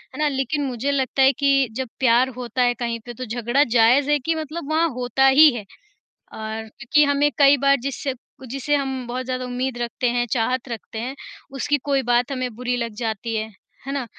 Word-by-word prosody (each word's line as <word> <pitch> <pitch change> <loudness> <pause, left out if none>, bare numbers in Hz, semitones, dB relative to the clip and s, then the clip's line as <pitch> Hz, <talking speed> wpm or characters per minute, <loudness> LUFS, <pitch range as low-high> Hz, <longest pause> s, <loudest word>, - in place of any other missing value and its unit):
है - - -8
ना? 305 - +2
लेकिन 275 +1 -1
मुझे 265 +2 -2
लगता 270 -1 0
है 265 0 +7
कि 275 -2 +3
जब 260 -2 -2
प्यार 255 0 +4
होता 250 0 -3
है 245 0 +3
कहीं 235 -1 -3
पे 240 - -7
तो 255 +2 -6
झगड़ा 240 +4 +1
जायज़ 245 +3 +3
है 295 - +3
कि 325 +5 -1
मतलब 310 0 -5
वहाँ 325 +2 +3
होता 250 +2 +2
ही 295 +4 +8
है। 210 -4 -6 0.7
और 220 0 -5
क्योंकि 275 +7 +2
हमें 285 +1 +2
कई 280 0 +7
बार 275 0 +5
जिससे 275 0 -3 0.3
जिसे 275 +4 -1
हम 265 -2 -3
बहुत 250 +2 -4
ज़्यादा 255 0 -3
उम्मीद 250 0 -3
रखते 240 +1 -2
हैं, 240 0 0
चाहत 250 +2 0
रखते 225 -1 -7
हैं, 250 +4 -4 0.4
उसकी 290 +2 0
कोई 275 -2 +1
बात 245 +2 +2
हमें 255 -3 -3
बुरी 245 +1 -2
लग 230 -3 -4
जाती 225 0 -3
है। 220 0 -2 0.4
है 275 - -3
ना? 275 -3 -2
255 Hz, 205 wpm, -22 LUFS, 240-275 Hz, 0.7 s, ही